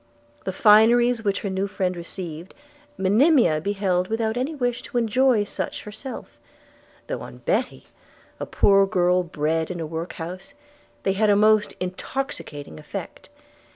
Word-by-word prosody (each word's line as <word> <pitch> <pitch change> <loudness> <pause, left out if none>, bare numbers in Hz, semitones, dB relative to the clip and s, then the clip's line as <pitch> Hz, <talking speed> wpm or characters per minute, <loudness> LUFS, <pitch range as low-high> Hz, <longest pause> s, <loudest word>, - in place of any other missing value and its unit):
The - - -1
fineries 225 +4 +5
which 200 -2 0
her 200 - -3
new 190 +1 -1
friend 185 -2 -2
received 170 0 -7 0.4
Monimia 205 - +4
beheld 190 -1 0
without 220 +1 -1
any 265 +6 -2
wish 245 -3 -1
to 250 - -5
enjoy 240 0 +3
such 205 - -5
herself; 220 +6 -9 0.7
though - - -4
on - - -9
Betty, - - -2 0.5
a - - -4
poor 195 -1 +4
girl 180 -1 +2
bred 160 -1 -1
in 180 -2 -5
a 165 - -3
workhouse, 170 - -7 0.5
they 195 - +1
had 210 +2 +2
a 205 - +5
most 215 0 +3
intoxicating 180 - -5
effect. - - -8
200 Hz, 140 wpm, -23 LUFS, 180-225 Hz, 0.7 s, fineries